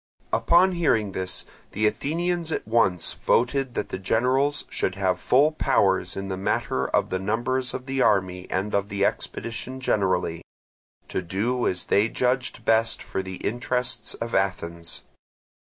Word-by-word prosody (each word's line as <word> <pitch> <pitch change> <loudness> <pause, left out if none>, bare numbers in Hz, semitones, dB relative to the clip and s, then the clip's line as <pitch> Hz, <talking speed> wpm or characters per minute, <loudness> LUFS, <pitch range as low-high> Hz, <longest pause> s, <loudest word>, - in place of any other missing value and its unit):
Upon 170 +12 +5
hearing 115 - +1
this 95 -1 -3 0.3
the 110 +2 +1
Athenians 170 +8 0
at - - -3
once 110 -7 +3
voted 130 +1 +1
that - - -2
the - - -4
generals 130 +9 +1
should 95 - -2
have 95 -2 0
full 145 +5 +4
powers 95 - +2
in 95 0 -4
the 95 - -2
matter 65 -8 -1
of - - 0
the 95 - 0
numbers 120 +6 -1
of 130 - -6
the 135 0 -1
army 95 -4 +1
and 95 +3 -2
of 100 0 0
the 100 0 +1
expedition 125 +3 -3
generally, 95 -8 0 0.7
to - - -2
do 105 +8 -1
as 90 -1 -1
they 105 +3 +3
judged 125 -2 -1
best 115 0 +2
for - - -3
the 95 0 -7
interests 125 +2 -1
of 115 0 -5
Athens. 85 -3 -2
110 Hz, 155 wpm, -25 LUFS, 95-130 Hz, 0.7 s, Upon